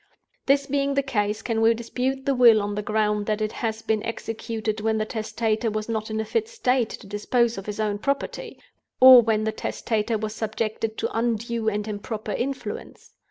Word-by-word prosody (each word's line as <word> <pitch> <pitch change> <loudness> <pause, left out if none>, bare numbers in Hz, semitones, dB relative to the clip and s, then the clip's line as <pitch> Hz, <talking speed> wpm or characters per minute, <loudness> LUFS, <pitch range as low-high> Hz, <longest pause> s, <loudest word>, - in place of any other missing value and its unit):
"This 275 0 +3
being 280 0 0
the 280 - +2
case, 215 -4 -1
can 225 -2 -1
we 225 +1 +5
dispute 255 +3 -3
the 275 - +2
Will 240 -4 +7
on 205 0 -2
the 210 - -2
ground 210 -1 0
that 215 -1 0
it 215 0 -1
has 225 -1 -3
been 215 -1 0
executed 225 -1 -4
when 220 0 +1
the 215 - 0
Testator 220 +1 -1
was 215 0 -3
not 220 -1 -3
in 220 0 -2
a 220 - -1
fit 440 - -1
state 255 - +1
to - - -9
dispose 230 +4 0
of 195 +1 -8
his 210 0 -5
own 210 -1 -1
property? 280 +5 -3 0.4
or 255 -1 +10
when 220 -2 +1
the 220 - 0
Testator 220 0 -2
was 215 0 -4
subjected 220 0 -3
to - - -3
undue 230 0 0
and 210 0 -3
improper 215 +1 -5
influence? 265 +6 -5
220 Hz, 195 wpm, -24 LUFS, 215-240 Hz, 0.4 s, or